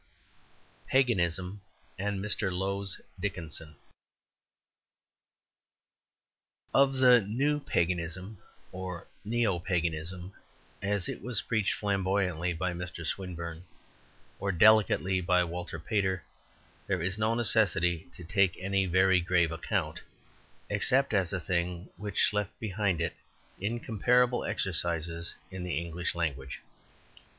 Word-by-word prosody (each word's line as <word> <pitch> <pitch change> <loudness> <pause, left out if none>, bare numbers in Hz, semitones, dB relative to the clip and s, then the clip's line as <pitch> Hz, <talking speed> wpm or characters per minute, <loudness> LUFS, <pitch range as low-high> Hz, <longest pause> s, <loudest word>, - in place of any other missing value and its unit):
XII - - -31
Paganism 95 -7 +1 0.3
and 100 0 -2
Mr. 105 -2 0
Lowes 95 +1 -1 0.2
Dickinson 80 -5 -4 3.0
Of 135 0 +5
the 125 -2 +7
New 135 +9 0
Paganism 90 - -1 0.3
(or 90 -2 -6 0.2
neo 110 -4 +1
Paganism), 85 +1 -2 0.5
as 100 -2 0
it - - -5
was 115 0 -2
preached 110 -3 +1
flamboyantly 95 -4 0
by 90 +2 -1
Mr. 85 -1 -5
Swinburne 85 -2 -4 0.8
or 100 - 0
delicately 95 -1 +5
by 90 0 +3
Walter 85 0 -5
Pater, 95 -1 0 0.6
there 95 -4 0
is 95 +3 -1
no 110 +1 +2
necessity 100 -8 +2
to 90 - -10
take 95 0 +2
any 95 0 +1
very 95 +1 +4
grave 85 -1 +2
account, 80 -1 -2 0.7
except 135 -1 +2
as 95 -4 +2
a 95 - -1
thing 85 +1 -2
which 105 0 +1
left 105 +1 -2
behind 100 -5 0
it 80 - -1 0.5
incomparable 120 +3 +2
exercises 85 -1 -1 0.2
in 95 -1 -5
the 90 -1 -2
English 85 +1 -2
language. 70 -6 -3
95 Hz, 110 wpm, -30 LUFS, 85-105 Hz, 3.0 s, the